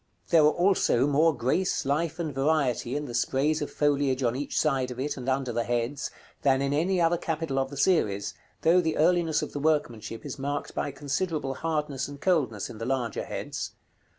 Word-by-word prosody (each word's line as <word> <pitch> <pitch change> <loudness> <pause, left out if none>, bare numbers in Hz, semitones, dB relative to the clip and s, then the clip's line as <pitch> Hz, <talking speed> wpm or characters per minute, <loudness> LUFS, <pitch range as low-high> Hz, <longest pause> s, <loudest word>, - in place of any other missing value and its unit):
There 165 -3 +6
are 150 - +6
also 175 -7 +3
more 150 +3 +4
grace, 145 +7 0
life, 155 +4 0
and 160 -4 -3
variety 135 -3 +1
in 145 0 -2
the 120 - -7
sprays 140 +6 +1
of 150 - -2
foliage 140 -3 +1
on 120 0 +1
each 140 +2 -2
side 135 -4 +1
of 125 0 -7
it, 145 +2 -2
and 130 0 -4
under 130 -2 0
the 115 0 0
heads, 120 +4 -2 0.3
than 135 -1 +3
in 140 0 0
any 180 +5 +1
other 170 0 +3
capital 160 -5 -2
of 135 0 -1
the 140 - -8
series, 100 - +1 0.3
though 175 +3 +5
the 160 -2 -1
earliness 165 -1 +3
of - - -6
the 145 - -3
workmanship 140 -7 -1
is - - -6
marked 145 +1 -3
by - - -2
considerable 145 +1 -2
hardness 150 -3 -2
and 140 0 -9
coldness 140 - +1
in 110 - -10
the 115 - -3
larger 130 -2 -1
heads. - - -5
145 Hz, 200 wpm, -27 LUFS, 130-160 Hz, 0.3 s, There